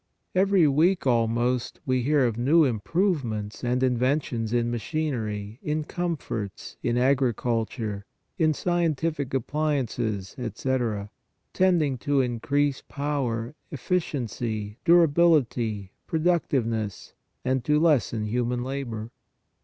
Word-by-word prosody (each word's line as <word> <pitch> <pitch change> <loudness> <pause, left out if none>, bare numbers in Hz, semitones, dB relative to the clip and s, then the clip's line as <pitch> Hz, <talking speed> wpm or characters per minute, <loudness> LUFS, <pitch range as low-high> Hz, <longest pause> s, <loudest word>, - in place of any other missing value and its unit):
Every 190 -3 +4
week 165 +6 +3
almost 120 0 +1
we 130 -1 +1
hear 140 +1 +3
of 115 -3 0
new 145 +7 +4
im 120 -5 0
provements 120 - -1
and 125 +1 +1
inventions 125 -2 0
in 120 0 +1
machinery, 115 -5 -3
in 155 +1 -1
com 175 +1 -2
forts, 105 -7 -6
in 120 -1 0
agriculture, 120 -5 0 0.3
in 155 -2 +3
scientific 165 -5 0
appliances, 125 -8 -1
etc., 115 -3 -2 0.4
tending 165 -8 +2
to 145 +2 +1
increase 135 +3 0
power, 135 -4 -2 0.2
efficiency, 120 - -3
durability, 145 - +3 0.2
pro 160 - -1
ductiveness, 120 - 0 0.3
and 130 -1 +1
to 150 0 +3
lessen 135 -9 +2
human 120 +2 -1
labor. 120 -4 -4
130 Hz, 105 wpm, -26 LUFS, 115-150 Hz, 0.4 s, Every